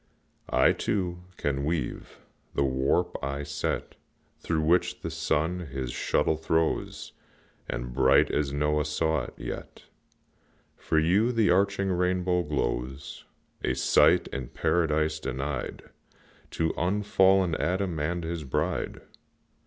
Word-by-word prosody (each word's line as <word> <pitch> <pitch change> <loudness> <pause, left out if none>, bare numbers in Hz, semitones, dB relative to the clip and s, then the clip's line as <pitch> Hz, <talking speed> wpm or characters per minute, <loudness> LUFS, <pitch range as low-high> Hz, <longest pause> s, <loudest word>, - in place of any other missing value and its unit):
I, 65 +2 +4
too, 90 -3 -2
can 70 -1 -1
weave; 80 +2 -3 0.3
the 70 - +2
warp 65 0 +1
I 70 +1 -2
set 70 0 -3 0.4
Through 80 -2 -1
which 85 +4 +2
the - - -4
sun 80 +4 0
his 65 -2 -4
shuttle 80 - +1
throws, 80 0 -1 0.6
And, - - -4
bright 65 +1 +4
as 70 -2 0
Noah 75 +1 +1
saw 80 -2 0
it, - - -11
yet - - -7 0.9
For 80 - -1
you 95 +10 +3
the 115 -6 +3
arching 100 +1 +2
rainbow 90 0 +1
glows, 65 -2 -3 0.4
A - - +1
sight - - +4
in 65 -2 -5
Paradise 80 +1 +1
denied 70 -1 -4 0.7
To 80 -1 -1
unfallen 95 -1 +3
Adam 90 -2 -1
and 85 +3 -1
his 80 -1 -4
bride. 65 - -2
80 Hz, 120 wpm, -27 LUFS, 70-90 Hz, 0.9 s, I